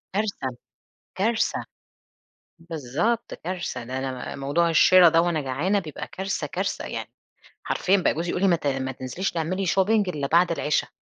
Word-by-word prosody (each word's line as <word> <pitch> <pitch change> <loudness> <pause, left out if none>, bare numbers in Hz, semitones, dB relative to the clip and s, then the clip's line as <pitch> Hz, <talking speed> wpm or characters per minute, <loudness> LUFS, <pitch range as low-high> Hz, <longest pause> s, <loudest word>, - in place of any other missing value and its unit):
كارثة، 205 -9 -1 0.7
كارثة 220 +4 +1 1.0
بالضبط 165 - -2
كارثة، 170 -8 -5
ده 130 +2 -4
أنا 130 -1 -4
ب - - -9
موضوع 150 +5 +1
الشرا 180 +2 +7
ده 165 0 +4
وأنا 170 -2 0
جعانة 150 +9 0
بيبقى 160 -6 -6
كارثة، 195 +1 -3
كارثة. - - -3
يعني - - -5 0.6
حرفيًا 195 +2 +2
بقى 185 - +2
جوزي 170 +2 -3
يقول 180 - -1
لي: 195 - +4
"ما 175 - +5
ت 155 - -4
ما 135 -1 -1
تنزليش 130 +9 -3
تعملي 175 +4 -2
shopping 195 +4 +2
إلا 145 -5 -2
بعد 170 +3 +4
العِشا 150 -2 0
170 Hz, 165 wpm, -25 LUFS, 140-190 Hz, 1.0 s, الشرا